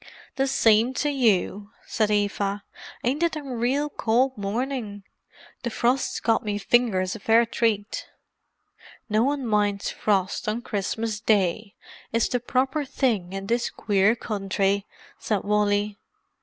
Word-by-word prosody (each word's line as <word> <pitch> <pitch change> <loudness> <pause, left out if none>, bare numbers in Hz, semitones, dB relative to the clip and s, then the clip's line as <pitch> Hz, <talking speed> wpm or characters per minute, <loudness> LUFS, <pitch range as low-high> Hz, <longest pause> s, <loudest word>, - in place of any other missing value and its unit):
"The 270 0 +1
sime 230 -1 +3
to 295 +2 0
you," 210 -5 +1 0.2
said 215 -3 0
Eva. 205 -1 0 0.4
"Ain't 265 +6 0
it 340 -1 +1
a 305 - -5
real 260 +3 0
cold 255 -1 +1
morning? 215 0 -3 0.6
The 240 - -2
frorst's 245 +3 0
got 225 +1 +1
me 210 -1 -2
fingers 205 -3 +1
a - - -7
fair 225 +3 +4
treat." 225 -2 -1 1.0
"No 215 +1 +3
one 275 +1 0
minds 205 -2 +1
frost 195 0 0
on 230 +3 -2
Christmas 215 +1 -2
Day—it's 210 +2 -1
the 245 - 0
proper 265 +4 0
thing 235 -10 -1
in 195 0 -4
this 235 +3 0
queer 205 +1 +2
country!" 200 -2 -1 0.3
said 210 -3 -1
Wally. 205 0 +1
220 Hz, 130 wpm, -25 LUFS, 205-245 Hz, 1.0 s, fair